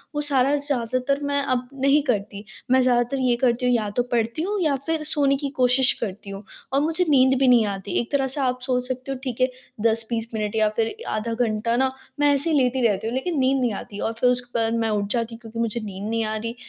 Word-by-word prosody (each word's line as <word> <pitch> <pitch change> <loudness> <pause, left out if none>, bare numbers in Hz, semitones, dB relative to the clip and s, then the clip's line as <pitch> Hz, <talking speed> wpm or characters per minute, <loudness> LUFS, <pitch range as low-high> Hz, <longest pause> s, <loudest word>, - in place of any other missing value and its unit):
वो 295 - 0
सारा 280 -1 +2
ज़्यादातर 275 -1 -1
मैं 285 0 0
अब 255 -3 -1
नहीं 275 +2 +3
करती। 205 -2 -2 0.3
मैं 260 0 +5
ज़्यादातर 245 +1 +2
ये 250 -2 +2
करती 250 0 +2
हूँ 250 - +3
या 220 -3 0
तो 245 - +2
पढ़ती 235 +5 0
हूँ 405 +4 -1
या 305 -5 +2
फिर 320 -1 -1
सोने 290 -3 +1
की 280 0 -3
क़ोशिश 255 +1 +4
करती 205 -1 -5
हूँ 195 +1 -7 0.3
और 275 - +3
मुझे 330 +4 +1
नींद 265 -2 +4
भी 270 - +3
नहीं 240 -3 +5
आती। 195 -1 -5
एक 240 - -4
तरह 275 -2 +1
से 270 +3 -2
आप 255 -1 0
सोच 250 -1 -1
सकते 255 +1 -4
हो 270 - -3
ठीक 255 -2 -4
है 255 - +4 0.3
10-20 225 0 0
मिनट 215 -1 -2
या 215 -1 +3
फिर 225 - 0
आधा 215 +2 -2
घंटा 230 -1 0
न 265 - +2 0.3
मैं 290 0 +4
ऐसे 280 +4 +3
ही 305 - +3
लेटी 255 -1 +1
रहती 205 0 -1
हूँ 230 - -3
लेकिन 310 +5 -2
नींद 265 +1 +2
नहीं 240 -3 +1
आती 200 +1 -7
और 225 - -2
फिर 250 - +4
उसके 245 -1 -1
बाद 225 0 +1
मैं 225 -1 0
उठ 205 -1 0
जाती 230 -1 -1
हूँ - - -14
क्योंकि 230 0 -8
मुझे 230 0 -1
नींद 200 0 -6
नहीं 230 0 0
आ 215 0 -2
रही। 230 +2 -4
250 Hz, 250 wpm, -23 LUFS, 225-275 Hz, 0.3 s, मैं